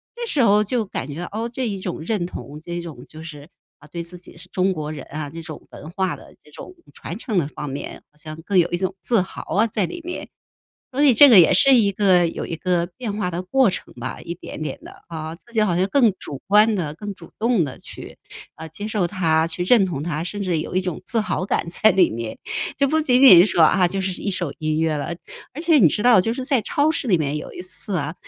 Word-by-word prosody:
这 475 0 -5
时 295 - +1
候 210 -1 +4
就 225 +2 -1
感 195 - -4
觉， 150 +3 -6
哦， 225 +3 -3
这 255 0 -2
一 200 -3 -4
种 180 -3 -5
认 180 +2 -2
同， 150 -3 -9
这 175 0 -5
种 155 -7 -10
就 155 0 -11
是， 150 -1 -10 0.3
啊， 150 - -17
对 170 -1 -5
自 175 +2 -8
己 175 - -14
是 - - -11
中 185 +1 +1
国 155 -2 -5
人 150 -3 -8
啊， 150 -1 -5
这 165 +3 -8
种 160 -2 -10
文 155 - -10
化 190 0 -1
的 - - -16
这 150 - -20
种 365 - -11 0.2
传 - - -7
承 215 -7 -3
的 145 - -1
方 150 -1 -7
面， 135 +2 -7
好 150 - -32
像 155 +1 -9
更 200 -1 0
有 170 - +2
一 175 - 0
种 185 +1 -2
自 230 -5 +2
豪 185 - -7
啊 215 +3 +3
在 205 -3 -1
里 345 - -7
面。 355 +1 -6 0.6
所 275 - 0
以 280 -4 +6
这 285 +5 +8
个 220 -6 +9
也 175 - +6
是 265 +9 +5
一 220 -5 +4
个 185 -3 +3
有 165 - -5
一 - - -6
个 175 0 0
变 235 -5 -4
化 205 -3 -2
的 175 +1 -3
过 255 +5 +3
程 180 - -6
吧， 125 +1 -6
一 170 - -6
点 155 - -9
点 150 -3 -4
的 - - -14
啊。 160 -1 -6
自 235 +7 -9
己 220 - +2
好 180 -5 +1
像 185 +2 +1
更 235 -1 +3
主 140 -2 -8
观 210 +2 +5
地、 160 -6 -3
更 205 +4 -6
主 170 - -15
动 230 -4 +2
地 135 -4 -7
去， - - -11 0.4
呃， 160 - -9
接 185 +7 -6
受 205 -5 0
它、 165 -4 +1
去 165 +2 -2
认 200 +1 +4
同 150 -6 -4
它， 160 -2 -3
甚 205 +3 -4
至 175 -4 0
有 160 - -5
一 185 - +2
种 180 -3 -5
自 225 +4 0
豪 210 -3 -2
感 - - -1
在 215 +5 +3
里 185 -3 +4
面， 115 0 -6 0.4
就 275 0 +2
不 315 +2 +2
仅 260 -3 +3
仅 215 -10 +10
是 210 - +1
说 170 - +3
啊， 180 +3 +4
就 195 +2 -2
是 190 -1 -3
一 - - -2
首 180 -6 -2
音 155 0 -1
乐 160 -1 +1
了。 145 +4 -4 0.4
而 305 - -6
且 330 -2 +4
你 195 - +6
知 210 - -1
道 245 -4 +6
就 225 +5 0
是 260 - -5
在 265 -4 +2
超 295 - +1
市 290 - -3
里 190 -6 +3
面 150 -1 -2
有 - - -8
一 - - -7
次 185 +2 0
啊， 150 -2 -2
185 Hz, 280 characters per minute, -21 LUFS, 160-220 Hz, 0.6 s, 仅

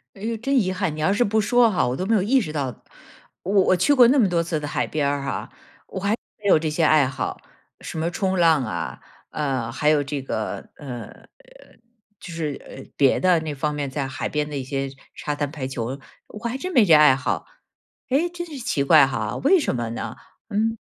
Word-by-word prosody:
哎 195 - -14
呦， 225 +1 -2
真 275 +5 -1
遗 185 -1 -1
憾， 185 -5 -2
你 - - -8
要 155 +5 +2
是 205 +4 +3
不 220 +1 +1
说 240 +1 +4
哈， 175 - +1
我 125 - -1
都 185 - -2
没 225 - +1
有 210 - +3
意 255 +7 +3
识 155 -10 -4
到。 135 -5 -4 0.6
我 190 - -3
我 185 - +3
去 185 - +3
过 245 -2 +8
那 275 +1 +4
么 200 -5 +4
多 170 -1 +1
次 165 -2 -2
的 145 - -5
海 - - -1
边 145 -2 -1
儿 140 -1 -2
哈， 140 - -4 0.4
我 190 - -6
还 200 +2 0 0.3
没 210 - -17
有 155 - +6
这 155 -1 -2
些 160 +2 0
爱 150 -3 +5
好， 130 -5 -4 0.4
什 - - -7
么 170 +2 -1
冲 190 0 -1
浪 160 -5 +4
啊， 85 -8 -5 0.3
呃， 130 -6 -2
还 150 +4 +1
有 150 -2 +3
这 140 0 -4
个， 110 -4 -4
呃， 125 -5 -9 0.9
就 180 - -9
是， 155 -4 -4
呃， - - -10
别 135 -2 +3
的 180 -2 +4
那 155 -2 -5
方 150 +2 -1
面 145 -2 -3
在 135 0 -3
海 130 +1 -4
边 150 0 -1
的 150 - -6
一 135 - -3
些 135 +1 -3 0.3
沙 150 - -3
滩 145 -1 -2
排 140 -4 -5
球， 130 +1 -4 0.3
我 210 - -10
还 250 +3 -3
真 370 +4 -4
没 225 -4 +6
这 165 - +5
爱 150 -3 +7
好， 130 - -3 0.6
诶， 310 +7 +2
真 345 0 -6
是 295 -5 -8
奇 145 - -1
怪 145 -2 +6
哈， 135 - -3
为 360 +6 +4
什 290 - -1
么 120 -2 -3
呢？ 115 - -5 0.3
嗯， 225 +2 0
155 Hz, 245 characters per minute, -23 LUFS, 140-205 Hz, 0.9 s, 过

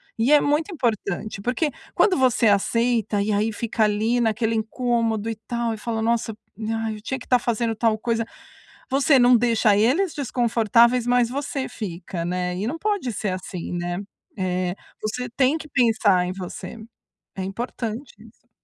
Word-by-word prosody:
E 230 +5 +1
é 300 - +8
muito 295 +6 0
importante, 215 - -2
porque 255 +7 0 0.2
quando 390 -4 +4
você 255 -3 +3
aceita 225 +1 +2
e 205 +2 0
aí 210 +2 +1
fica 220 0 0
ali 220 +4 +1
naquele 225 0 +1
incômodo 225 -1 0
e 225 - -2
tal, 230 +1 -3
e - - -6
fala: 225 0 -3
"Nossa, 225 -1 0 0.5
ai, 220 -1 -2
eu - - -13
tinha 265 +5 -3
que 250 - -11
estar 250 - +3
fazendo 230 -1 0
tal 220 0 +2
coisa", 230 0 -1 0.7
você 275 +1 +4
não 245 0 +6
deixa 225 -3 +3
eles 290 - +2
desconfortáveis, 235 -2 +2
mas 245 -1 +3
você 275 0 -3
fica, 175 -3 -5
né. 180 0 -2
E 200 +4 -2
não 300 +7 -3
pode 405 - -1
ser 210 -1 -2
assim, 185 -1 -5
né. 175 0 -2 0.4
É, 180 -1 0 0.3
você 230 +4 -3
tem 260 +5 +2
que 315 - -9
pensar 220 -9 +3
em 180 - -3
você. 185 +4 -7 0.6
É 190 - -3
importante 230 +4 -5
isso. 230 +2 -19
230 Hz, 165 wpm, -23 LUFS, 210-245 Hz, 0.7 s, é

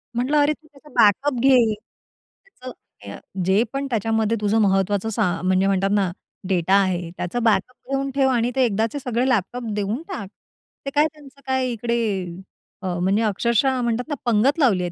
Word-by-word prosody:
म्हटलं 255 +5 +1
अरे, 290 +1 +3
तू 310 +1 -20
त्याचा 295 0 -19
बॅकअप 250 +6 +3
घे. 245 -4 +4 0.7
त्याचं 255 - -11 0.4
अ, - - -8 0.3
जे 195 +4 +3
पण 275 0 -2
त्याच्यामध्ये 225 -1 0
तुझं 210 +2 +2
महत्त्वाचं 195 +2 +1
सा 220 0 0 0.2
म्हणजे 185 +1 +2
म्हणतात 195 0 +1
ना 195 -3 +1 0.4
डेटा 185 0 +1
आहे, 180 -3 -1
त्याचं 225 +7 -3
बॅकअप 225 +2 +1 0.2
घेऊन 275 0 -1
ठेव 270 -1 +3
आणि 240 -1 +1
ते 265 - +3
एकदाचे 225 +5 -1
सगळे 250 0 -1
लॅपटॉप 245 +1 -1
देऊन 210 +6 -2
टाक. 360 - -6 0.6
ते - - -1
काय 295 +1 +5
त्यांचं 280 -2 -17
काय 260 -1 0
इकडे 235 +1 -1 0.8
अ, 190 - -4
म्हणजे 195 +5 +1
अक्षरशः 235 +5 +1
म्हणतात 235 +2 -1
ना, 295 - -1
पंगत 240 +7 +2
लावली 205 -11 +3
आहे 175 - -3
230 Hz, 175 wpm, -22 LUFS, 200-265 Hz, 0.8 s, काय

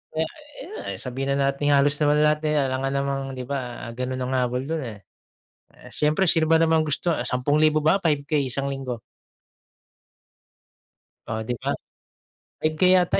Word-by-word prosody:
Eh, 160 - +2 0.4
ayan, 390 +9 -8
eh, - - -10
sabihin 135 +2 -2
na 140 0 +2
natin 145 +1 +2
halos 145 +1 +3
naman 150 0 +3
lahat, 150 0 +3
eh, 150 - +1
alangan 135 -1 0
namang 140 0 0
di 130 - -5
ba 125 -2 -4
ganun 125 +2 -3
ang 130 +1 -2
habol 125 +1 0
dun, 160 +4 -2
eh, 105 -5 -8 0.7
eh, - - -15
siyempre 150 +6 +2
sino 160 -2 +3
ba 165 - +6
namang 160 -1 +4
gusto, 155 +3 0
10,000 150 +5 +2
ba, 160 +6 +2
5K 145 -2 +1
isang 135 +1 -1
linggo? 135 -4 -4 2.3
Oh 110 0 -3
'di 120 +3 -2
ba? - - -1 0.9
5K 155 +3 +1
yata 180 0 +3
140 Hz, 160 wpm, -24 LUFS, 130-155 Hz, 2.3 s, ba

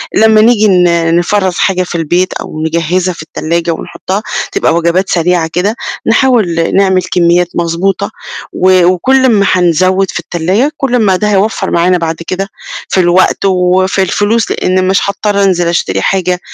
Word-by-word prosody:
لمّا 220 0 +4
نيجي 220 -2 +3
ن 170 -3 +2
نفرَّز 190 +1 0
حاجة 185 -2 0
في 175 - -7
البيت 175 +3 0
أو 155 0 -6
نجهّزها 170 +3 -1
في 155 - -9
التلّاجة 170 +2 -3
ونحطّها 190 +5 -5 0.3
تبقى 165 - 0
وجبات 170 +3 0
سريعة 170 -1 0
كده، 200 +6 -1 0.3
نحاول 225 -9 +1
نعمل 190 -1 +2
كمّيات 175 0 +2
مضبوطة، 180 +5 -1 0.4
و 185 -1 +3
وكلّ 260 +9 +2
أما 210 -5 +3
هنزوّد 185 +2 +1
في - - -4
التلّاجة، 185 - -1
كلّ 265 -3 -1
أما 205 -6 +2
ده 210 +3 -1
هيوفَّر 195 -1 -1
معانا 180 +1 +2
بعد 165 -1 -3
كده 195 +1 -3 0.4
في 190 - 0
الوقت 180 +2 +2
وفي 185 +1 +1
الفلوس، 205 +4 0
لإن 185 0 0
مش 195 - +2
هاضطر 200 0 -1
أنزِل 175 -3 +1
أشتري 95 - -1
حاجة 180 - -1
185 Hz, 155 wpm, -11 LUFS, 170-200 Hz, 0.4 s, لمّا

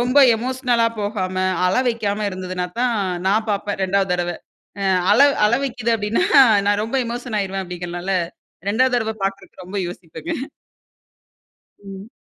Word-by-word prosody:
ரொம்ப 250 +4 +3 0.2
எமோஷன்னலா 245 -1 0
போகாம, 205 -3 -2 0.3
அழவைக்காம 215 -2 0
இருந்ததுன்னா 185 -1 -4
தான் 245 -2 +2 0.3
நான் 215 +2 +1
பாப்பேன், 205 -1 -2
2வது 195 -1 +1
தடவ. 175 0 -2 0.5
அ - - -1 0.3
அழ - - +4 0.3
அழவைக்குது 240 -1 0
அப்படின்னா, 210 -3 0 0.4
நான் 205 +1 +2
ரொம்ப 230 +4 -2
எமோஷன் 240 -2 -3
ஆயிருவேன் 195 0 -3
அப்படிங்கறனால, 175 +1 -5 0.6
2வது 255 +3 +2
தறவ 220 -1 -2
பாக்கறக்கு 195 -1 -5
ரொம்ப 200 +2 -4
யோசிப்பங்க. 165 -2 -9 1.5
ம். 195 +1 -10
205 Hz, 125 wpm, -21 LUFS, 185-235 Hz, 1.5 s, அழ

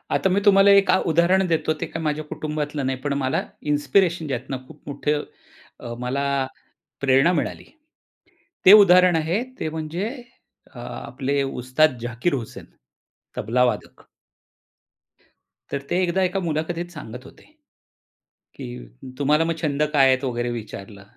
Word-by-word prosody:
आता 190 - +1
मी 190 +2 +2
तुम्हाला 200 -1 +6
एक 200 0 +5
अ, - - +5
उदाहरण 175 +4 +3
देतो. 160 -2 +1
ते - - -2
काय 165 - -3
माझ्या 150 0 -1
कुटुंबातलं 150 -2 -4
नाही 130 0 -1
पण 145 - 0
मला 130 - 0 0.3
इन्स्पिरेशन 170 +2 +1
ज्यातनं 130 0 -5
खूप 150 - -15
मोठं 145 +1 -1 0.6
अ, 120 -1 -7
मला 135 +3 -1 0.8
प्रेरणा 135 +5 +4
मिळाली. - - -5 1.0
ते 190 - +10
उदाहरण 180 -2 +5
आहे 165 +7 0 0.2
ते 155 - -2
म्हणजे 160 +6 -3 0.6
अ, - - -11
आपले 140 +1 -3
उस्ताद 130 +2 +1
झाकीर 120 +7 -1
हुसेन 120 -5 -7 0.7
तबलावादक. 125 +3 -1 1.7
तर 140 - -3
ते 175 - +1
एकदा 180 +2 0
एका 185 +1 0
मुलाखतीत 170 +1 -3
सांगत 125 -6 -9
होते. - - -16 1.1
की - - -7 0.5
तुम्हाला 150 +3 +3
मग 165 0 -1
छंद 150 -2 0
काय 135 -2 +5
आहेत 130 +1 +2
वगैरे 120 -1 -2
विचारलं. 105 -3 -8
150 Hz, 135 wpm, -23 LUFS, 130-170 Hz, 1.7 s, ते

